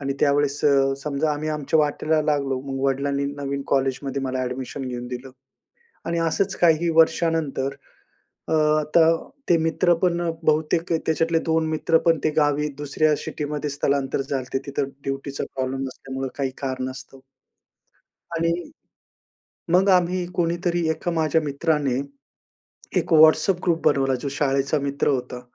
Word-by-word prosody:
आणि 140 -1 -2
त्यावेळेस 145 0 +2 0.4
समजा 150 +1 -1
आम्ही 150 +1 -3
आमच्या 150 +1 0
वाटेला 155 +1 +1
लागलो. 140 -3 0
मग 135 0 -5
वडिलांनी 140 +1 0
नवीन 140 0 -3
कॉलेजमध्ये 135 0 0
मला 130 -1 -2
एडमिशन 130 +1 -5
घेऊन 125 -1 -5
दिलं 125 +1 -7 0.8
आणि 170 0 -1
असंच 165 +4 0
काही 170 0 +3
वर्षानंतर, 160 -5 +2 0.7
अ, - - -1
आता 155 +1 +3 0.5
ते 175 - +5
मित्र 165 +2 +2
पण 175 -1 +2 0.2
बहुतेक 160 +2 +1
त्याच्यातले 165 0 +1
2 160 0 +2
मित्र 160 +1 +2
पण 165 -2 +4
ते 155 - +3
गावी 150 0 +2
दुसऱ्या 150 +1 +1
सिटीमध्ये 150 0 -4
स्थलांतर 140 -1 0
झालते 135 -1 -2
तिथं 140 0 -2 0.2
ड्युटीचा 135 +1 -3
प्रॉब्लेम 135 +1 -2
असल्यामुळं 135 +1 -6
काही 135 -2 -1
कारणास्तव. 130 -1 -5 1.2
आणि 165 0 +2 1.2
मग 190 +2 +5
आम्ही 180 0 +3
कोणीतरी 170 0 0
एका 160 +2 -3
माझ्या 160 -1 +1
मित्राने 145 -3 0 1.0
एक - - -2
व्हॉट्सॲप 160 +3 +6
ग्रुप 170 -2 +1
बनवला 135 -2 +3
जो 140 - -2
शाळेचा 140 +1 0
मित्र 140 +1 -1
होता 125 -2 -2
145 Hz, 130 wpm, -23 LUFS, 135-160 Hz, 1.2 s, व्हॉट्सॲप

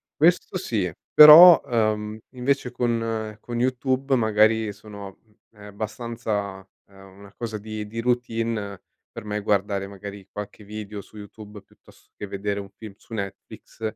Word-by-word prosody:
Questo 175 +4 +2
sì, 100 - -2 0.2
però, 160 +3 +10
ehm, 110 -3 -1 0.2
invece 125 0 -1
con 115 -3 -2
con 120 -1 -5
YouTube 130 +1 0
magari 110 -1 +2
sono, 100 -1 -11
mhmm, 110 -2 -32 0.2
ehm, 105 - -12
abbastanza 105 -2 -4 0.3
ehm, 95 -1 -17
una 100 0 -15
cosa 110 -2 -5
di 105 0 -7
di 115 +2 -5
routine 115 -4 -2 0.3
per 115 - -9
me 105 0 -3
guardare 100 -1 -1
magari 100 0 -10
qualche 105 +1 -8
video 105 0 -8
su 110 - -17
YouTube, 105 0 -12
piuttosto - - -24
che 105 - -7
vedere 100 +1 -3
un 100 -1 -8
film 110 -3 -10
su 115 - -11
Netflix, 100 +2 -9
110 Hz, 145 wpm, -24 LUFS, 100-115 Hz, 0.3 s, però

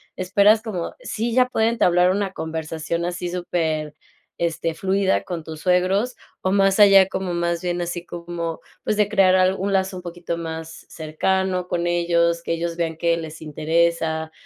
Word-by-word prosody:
¿esperas 200 +4 +4
como 190 -7 -4
sí 230 +2 -3
ya 255 +1 +4
pueden 225 -2 +2
entablar 180 -5 +3
una 195 0 -1
conversación 160 +1 -4
así 175 0 -3
súper, 160 -4 -2 0.4
este, 165 -1 -1
fluida 190 +2 +1
con 175 -3 -5
tus 160 -1 -8
suegros? 190 +6 +1 0.3
O 185 - 0
más 195 0 +3
allá 195 -2 +8
como 190 -2 -3
más 170 0 -1
bien 175 -1 -2
así 175 0 -4
como, 170 -1 -5 0.2
pues, 215 - -1
de 210 -1 +2
crear 195 -3 +4
al 185 0 +3
un 195 +1 -2
lazo 190 0 0
un 180 - -9
poquito 175 -1 -5
más 160 -1 -7
cercano 180 +4 -1
con 175 -1 -1
ellos, 170 -1 +1
que - - -1
ellos 170 0 -3
vean 165 -2 -2
que 170 0 +1
les 160 -1 -8
interesa, 160 +1 0
175 Hz, 170 wpm, -22 LUFS, 165-190 Hz, 0.4 s, allá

